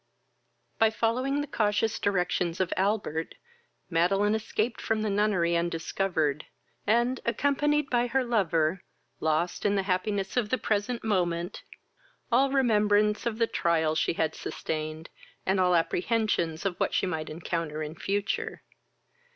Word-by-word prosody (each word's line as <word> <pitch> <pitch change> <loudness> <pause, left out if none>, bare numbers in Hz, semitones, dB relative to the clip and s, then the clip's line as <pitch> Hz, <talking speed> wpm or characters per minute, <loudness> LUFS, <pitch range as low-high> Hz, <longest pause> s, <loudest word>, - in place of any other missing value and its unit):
By 225 - +6
following 255 +6 0
the - - -2
cautious 215 -1 0
directions 180 -3 0
of 185 -2 0
Albert, 190 -5 -1 0.5
Madeline 195 +5 +2
escaped 220 +1 -1
from 220 -1 0
the 215 - 0
nunnery 195 -5 +2
undiscovered, 165 -3 -1 0.4
and, 240 +4 +2
accompanied 285 +4 +1
by 245 0 +2
her 265 +2 +1
lover, 180 -7 +1 0.4
lost, 160 +3 0
in 205 -1 +2
the 195 - +1
happiness 195 +1 -1
of 225 -4 +1
the 255 - +1
present 220 +2 -1
moment, 175 -4 -1 0.7
all 265 +4 +4
remembrance 210 -5 +2
of 225 -2 -2
the 230 - +3
trials 160 -6 +1
she - - +1
had 160 -1 0
sustained, 155 +1 -5 0.3
and 190 0 +2
all 180 -1 +4
apprehensions 175 -1 0
of 185 -3 -1
what - - 0
she - - +2
might 160 -4 -3
encounter 160 -1 -3
in 150 0 -5
future. 200 +4 -2
200 Hz, 135 wpm, -28 LUFS, 170-225 Hz, 0.7 s, By